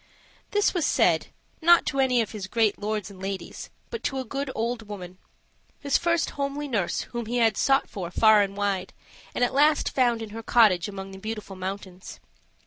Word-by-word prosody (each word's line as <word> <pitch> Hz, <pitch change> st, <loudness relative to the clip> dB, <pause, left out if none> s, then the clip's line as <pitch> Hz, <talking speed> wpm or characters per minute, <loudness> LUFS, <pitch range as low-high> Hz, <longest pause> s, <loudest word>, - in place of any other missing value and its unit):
This 415 Hz, 0 st, +2 dB
was 350 Hz, -4 st, 0 dB
said, -, -, +2 dB, 0.3 s
not 345 Hz, +1 st, +6 dB
to 275 Hz, -2 st, -2 dB
any 255 Hz, -2 st, +3 dB
of 220 Hz, -, -4 dB
his 205 Hz, -4 st, -6 dB
great 220 Hz, 0 st, +1 dB
lords 210 Hz, 0 st, -3 dB
and 190 Hz, -1 st, -13 dB
ladies, 190 Hz, -2 st, -6 dB, 0.2 s
but 465 Hz, -, -4 dB
to 270 Hz, -, -1 dB
a 260 Hz, -, -3 dB
good 275 Hz, +3 st, -4 dB
old 230 Hz, -1 st, -2 dB
woman 185 Hz, -3 st, -8 dB, 0.6 s
his 280 Hz, -2 st, +1 dB
first 340 Hz, -1 st, +1 dB
homely 280 Hz, +1 st, -3 dB
nurse 205 Hz, -10 st, -1 dB
whom 235 Hz, -2 st, -4 dB
he 240 Hz, +2 st, -1 dB
had 225 Hz, -3 st, +3 dB
sought 270 Hz, +5 st, +2 dB
for 180 Hz, -4 st, -6 dB
far 215 Hz, +3 st, +5 dB
and 200 Hz, 0 st, -2 dB
wide, 200 Hz, -2 st, -1 dB, 0.4 s
and -, -, +1 dB
at 245 Hz, -, +1 dB
last 295 Hz, +2 st, +3 dB
found 240 Hz, -3 st, +2 dB
in 215 Hz, -, -8 dB
her 225 Hz, +1 st, -6 dB
cottage 215 Hz, -6 st, +4 dB
among 195 Hz, -1 st, -7 dB
the 190 Hz, -, -10 dB
Beautiful 215 Hz, -1 st, -6 dB
Mountains. 190 Hz, 0 st, -7 dB
220 Hz, 195 wpm, -26 LUFS, 195-270 Hz, 0.6 s, not